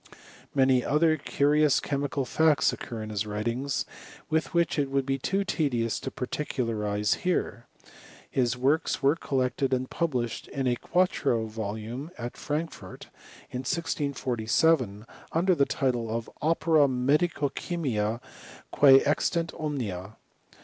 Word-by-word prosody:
Many 130 -2 +4
other 155 +2 +3
curious 150 0 +2
chemical 140 -1 -2
facts 155 +3 +3
occur 115 -3 -6
in 110 - -6
his 105 0 -2
writings, 115 +6 -2 0.4
which 160 0 +1
it 140 -2 0
would 135 -1 0
be 135 0 -1
too 195 +8 0
te 165 -7 0
dious 115 -3 -1
to - - -3
particularize 110 -7 -1
here. 180 -9 -1 0.6
His 125 -2 0
works 140 +3 +1
were 140 +3 +5
collected 130 -3 0
and 130 0 -3
published 125 -9 -2
in 135 -1 -3
a 125 -1 +2
quarto 145 -8 +1
volume 110 +6 -5
at 120 0 -5
Frankfort, 150 - -5 0.4
in 125 - -3
1647, 130 - 0 0.3
under 180 +3 +3
the 140 -5 +3
title 120 -4 0
of 115 +1 -3
" - - -33
Opera 160 -2 +3
Medico 145 +4 +1
chymica, 120 -11 -2 0.5
quce 135 -2 +7
extant 165 +3 0
omnia.' 110 -10 -4
135 Hz, 130 wpm, -27 LUFS, 115-150 Hz, 0.6 s, quce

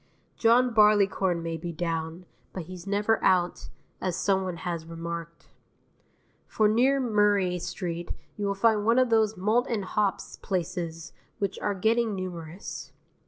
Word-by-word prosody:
John 245 +1 +4
Barleycorn 200 -5 +3
may 165 0 -3
be 170 +2 -5
down, 165 +1 -3 0.3
but 185 - -5
he's 180 +2 -10
never 210 +2 +1
out, 180 -2 +2 0.3
as 185 -2 -1
someone 190 -2 0
has 170 -2 -3
remarked. 170 0 -7 1.0
For 215 - +2
near 255 +6 +3
Murray 205 -6 +2
Street 175 -1 -4 0.3
you 205 -1 -2
will 200 - 0
find 215 +1 +3
one 230 +3 +3
of 255 -2 +3
those 220 -2 +3
malt 220 +7 +2
and 215 -5 -1
hops 200 +1 -1
places 170 -3 -4 0.2
which 200 -1 -2
are 205 -1 -1
getting 220 +2 +1
numerous. 175 -1 -7
190 Hz, 140 wpm, -27 LUFS, 170-215 Hz, 1.0 s, John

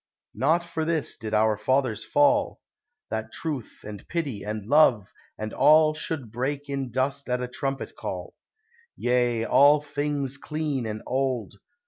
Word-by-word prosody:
Not 160 +5 +2
for 165 -2 -3
this 160 -2 -1
did 110 -1 -6
our 110 0 +3
fathers 120 -1 0
fall; 290 - +2 0.5
That 110 0 -3
truth, 145 -8 -5
and 105 -1 -9
pity, 145 -11 -3
and 105 -1 -4
love, 120 -7 +4 0.2
and 110 0 -5
all 155 0 +5
Should 155 -6 -4
break 140 +5 -3
in 135 -2 -3
dust 130 +3 -1
at 125 0 +1
a 125 - -3
trumpet 135 +2 -4
call, - - -6 0.6
Yea! 120 -2 +1
all 145 +5 +6
things 145 -2 -3
clean 150 -5 -3
and 110 0 -5
old. 130 -5 -1
135 Hz, 145 wpm, -26 LUFS, 115-150 Hz, 0.6 s, all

